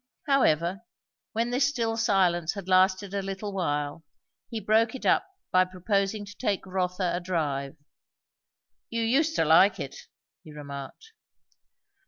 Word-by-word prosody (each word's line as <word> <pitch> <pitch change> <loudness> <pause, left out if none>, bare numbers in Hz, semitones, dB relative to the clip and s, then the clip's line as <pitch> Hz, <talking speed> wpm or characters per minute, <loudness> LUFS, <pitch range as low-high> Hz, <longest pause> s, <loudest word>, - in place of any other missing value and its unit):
However, 190 - +2 0.5
when 230 +2 0
this 250 +1 +3
still 230 -5 -1
silence 185 -6 +2
had 200 -2 -7
lasted 190 +1 +3
a 200 - -1
little 195 +1 -5
while, 150 -4 -2 0.5
he 230 - -4
broke 220 +3 +2
it 265 - -8
up - - +3 0.2
by 185 0 +5
proposing 195 +3 -1
to 205 0 -12
take 205 -7 -1
Rotha 180 -1 -1
a - - -1
drive. 155 -5 -2 1.1
"You 230 0 -1
used 300 +8 +2
to - - +2
like 185 +5 +5
it," 140 -3 -5 0.5
he 155 - -12
remarked. 145 - -9
190 Hz, 140 wpm, -27 LUFS, 170-225 Hz, 1.1 s, by